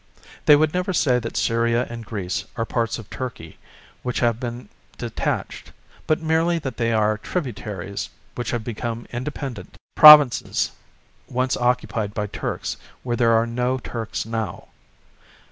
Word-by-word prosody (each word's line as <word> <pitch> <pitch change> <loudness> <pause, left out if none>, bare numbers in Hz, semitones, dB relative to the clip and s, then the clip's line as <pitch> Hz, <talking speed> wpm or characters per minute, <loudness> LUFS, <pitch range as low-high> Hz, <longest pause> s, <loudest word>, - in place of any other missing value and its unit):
They 150 - +9
would 155 +1 +2
never 180 +1 -1
say 125 -7 +3
that 115 -1 -5
Syria 115 +1 +1
and 115 -1 -7
Greece 100 -5 -4
are 115 -1 -1
parts 115 -1 -1
of 110 -3 -10
Turkey 120 -11 -7 0.4
which 125 -1 -2
have 120 -2 +2
been 120 -1 -6 0.3
detached, - - -3 0.4
but 155 - +2
merely 165 +2 +2
that 140 -5 -5
they 115 -1 +1
are 110 -1 +2
tributaries 105 - -4 0.2
which 120 - -4
have 120 -2 -2
become 115 0 -4
independent, 125 -5 -6 0.2
provinces 150 -5 +8 0.6
once 130 +1 0
occupied 120 -4 -1
by 105 - -1
Turks 105 - -4 0.3
where 120 -2 -1
there 115 -1 +3
are 115 0 +3
no 125 +2 -1
Turks 115 -4 -5
now. 110 -5 -4
120 Hz, 145 wpm, -23 LUFS, 115-130 Hz, 0.6 s, They